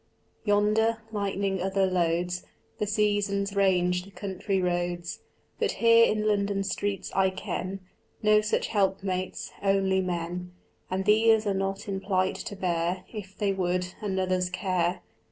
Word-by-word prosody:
Yonder, 215 +2 +3
lightening 200 -2 -1
other 190 +1 +2
loads, 180 0 0 0.4
The 210 - 0
seasons 205 -1 +1
range 180 -2 +3
the 195 - -13
country 195 0 -2
roads, 175 -1 -2 0.4
But - - +1
here 230 0 +5
in 215 0 0
London 200 -1 +1
streets 200 0 -2
I 190 0 +3
ken 185 0 -4 0.4
No 215 0 +5
such 210 - 0
helpmates, 190 -2 -1
only 195 -1 +2
men; 180 0 -3 0.4
And 190 +1 -1
these 220 +1 +5
are 200 - +1
not 195 +1 -2
in 195 -1 -2
plight 190 -1 +1
to 205 - -6
bear, 180 -1 -1
If 195 -3 -8
they 200 -2 +1
would, 180 -1 -1
another's 185 -3 0
care. 180 -1 0
195 Hz, 135 wpm, -27 LUFS, 180-205 Hz, 0.4 s, here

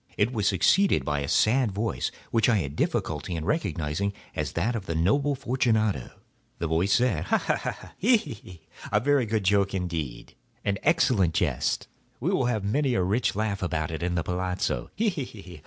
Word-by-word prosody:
It 110 +5 +2
was 105 -4 0
succeeded 190 - +3
by 75 -1 0
a 70 - -3
sad 120 - +3
voice, 115 +3 -1 0.2
which 115 -1 +3
I 115 - +4
had 70 -6 -3
difficulty 80 +3 -1
in 80 -1 -4
recognising 100 - -1 0.2
as - - -2
that 110 +8 0
of 105 -5 -5
the 85 - -2
noble 140 - +2
Fortunato. 115 - 0 0.5
The 85 - -2
voice 85 +5 +1
said— 120 -10 +2
"Ha! - - +3
ha! - - 0
ha!—he! 235 +5 0
he!—a 100 - -5
very 135 0 +2
good 110 -1 0
joke 100 0 +2
indeed—an 90 - -4
excellent 125 - +3
jest. - - 0 0.3
We - - 0
will 130 - +1
have 115 -5 0
many 130 +5 +1
a 95 - +2
rich 105 +6 +1
laugh 105 -2 -1
about 80 -3 -1
it 80 - -4
at 90 0 -1
the 85 - 0
palazzo—he! 90 - -1
he! 110 - -7
100 Hz, 170 wpm, -27 LUFS, 85-125 Hz, 0.5 s, I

